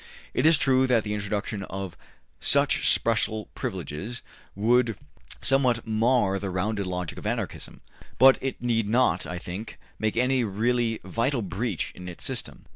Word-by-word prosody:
It - - +3
is 160 -1 +6
true 130 -1 +3
that 120 -4 +3
the 105 - -3
introduction 105 0 -3
of 95 -2 -6 0.4
such - - +3
special 110 -1 0
privileges 95 - -5 0.3
would 115 +2 +2 0.5
somewhat 125 -4 +2
mar 110 -3 +2
the 100 0 -3
rounded 100 +2 -1
logic 90 -1 -4
of - - -5
Anarchism, - - -4 0.4
but 130 +2 +7
it 135 0 -3
need 115 -3 +1
not, 125 +3 +2
I 90 - -4
think, 90 +5 -7 0.2
make 110 +1 -1
any 125 +1 +2
really 115 +2 0
vital 115 +6 -1
breach 95 +1 -2
in 90 0 -8
its 85 - -9
system. - - -4
110 Hz, 150 wpm, -26 LUFS, 95-125 Hz, 0.5 s, but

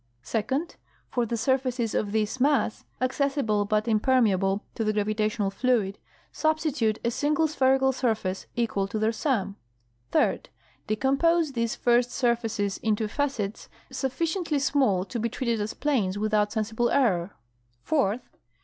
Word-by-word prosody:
Second. 260 +9 -2 0.3
For 240 -2 0
the 235 - -2
surfaces 250 -1 0
of 205 - -1
this 220 +3 -1
mass, 275 -4 +1
accessible 255 -5 0
but 215 +2 0
impermeable 210 -4 +2
to 225 - -2
the 215 0 +1
gravitational 215 0 0
fluid, 205 -2 0 0.3
substitute 310 -9 0
a 235 - +2
single 300 +5 +1
spherical 265 -2 +3
surface 220 -7 -2
equal 225 -5 0
to 200 - -4
their 215 +1 +2
sum. 220 -5 -1 0.5
Third. - - +1 0.4
Decompose 275 +8 +2
these 230 -3 -1
first 240 0 +2
surfaces 235 -5 0
into 215 0 0
facets 230 -5 -3 0.2
sufficiently 325 +4 -1
small 265 -9 +2
to 235 - -5
be 230 +1 0
treated 235 -2 -1
as 210 +2 -3
planes 220 -10 0
without 210 0 +1
sensible 225 +2 0
error. 200 -9 +1 0.5
Fourth. 250 -6 0
230 Hz, 130 wpm, -26 LUFS, 210-265 Hz, 0.5 s, spherical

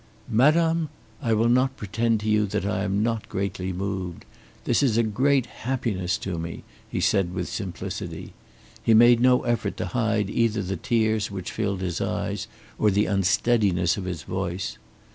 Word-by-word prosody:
"Madame, 160 +6 +3 0.3
I 115 -5 +1
will 115 +2 +3
not 130 +2 +2
pretend 110 +2 0
to 110 - -4
you 105 -1 +3
that 95 - -2
I 100 -1 -1
am 100 +1 0
not 115 -1 -2
greatly 95 -1 -3
moved. 95 -1 -4 0.4
This - - +2
is 125 -6 +2
a 115 - +4
great 130 +4 +2
happiness 115 -9 -2
to 90 -4 -3
me," 85 0 -6 0.3
he - - -2
said 90 -2 +1
with 90 -1 -2
simplicity. 90 -4 -5 0.5
He 115 - +4
made 120 +1 +7
no 125 +1 +4
effort 120 -2 -1
to - - -2
hide 115 -4 +1
either 110 0 +1
the 95 +1 -3
tears 110 +1 +1
which 95 -3 -5
filled 100 -4 -2
his 90 -4 -2
eyes - - -2 0.3
or 105 - +4
the 105 +1 +2
unsteadiness 95 -2 +2
of 100 - -5
his 90 -4 -4
voice. 95 0 -4
105 Hz, 170 wpm, -25 LUFS, 95-115 Hz, 0.5 s, made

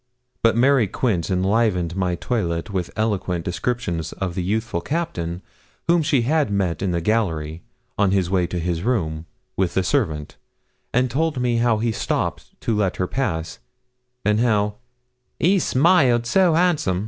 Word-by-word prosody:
But 115 0 +3
Mary 130 -2 +4
Quince 95 -4 -1
enlivened 95 -2 +1
my 90 -2 0
toilet 85 -3 -2
with 90 -3 -2
eloquent 95 -6 -1
descriptions 90 -4 -2
of 95 -3 -3
the 90 - -2
youthful 105 0 -1
Captain 90 - -3 0.4
whom 170 0 +4
she 140 -5 +2
had 150 +1 +1
met 95 -5 -1
in 95 - 0
the 85 -1 -1
gallery, 80 -7 -1 0.4
on 100 -2 +4
his 95 -2 +1
way 90 -1 +1
to 90 - -4
his 85 -1 -1
room, 85 -8 -1 0.3
with 95 -3 0
the 95 - +2
servant, 85 - -1 0.5
and 125 0 +1
told 155 +1 0
me 120 -1 +1
how 115 -1 +2
he 115 +2 0
stopped 110 - -3
to 115 - 0
let 100 -3 0
her 90 - -1
pass, 85 - -3 0.7
and 105 +1 +3
how 105 -3 +1 0.6
'he 190 +4 +4
smiled 130 -7 +3
so 175 +6 +3
'ansom.' 160 - +2
105 Hz, 160 wpm, -22 LUFS, 90-125 Hz, 0.7 s, Mary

